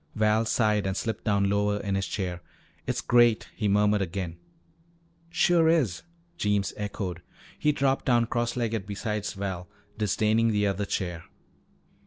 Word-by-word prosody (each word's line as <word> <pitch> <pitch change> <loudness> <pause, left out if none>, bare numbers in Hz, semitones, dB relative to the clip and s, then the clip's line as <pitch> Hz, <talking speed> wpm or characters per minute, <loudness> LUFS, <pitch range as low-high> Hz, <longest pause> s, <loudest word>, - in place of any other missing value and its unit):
Val 110 +1 +2
sighed 105 -3 +1
and 95 0 -2
slipped 115 -3 -3
down 100 -2 +2
lower 105 +1 +1
in 100 -1 -2
his 95 0 -1
chair. 90 -3 -3 0.5
"It's - - -1
great," 120 -2 +3
he 105 - -1
murmured 105 +1 +3
again. 90 -2 -3 0.9
"Sure 170 -1 +3
is," 130 - +2 0.4
Jeems 105 -2 +1
echoed. 100 -4 -4 0.4
He 150 - +3
dropped 135 -2 0
down 120 -2 +3
cross 120 0 -1
legged 115 -5 -2
beside 105 0 -3
Val, 95 -2 -4 0.3
disdaining 110 +2 +2
the 105 -2 +2
other 100 +1 0
chair. 90 -4 -3
105 Hz, 145 wpm, -27 LUFS, 100-115 Hz, 0.9 s, great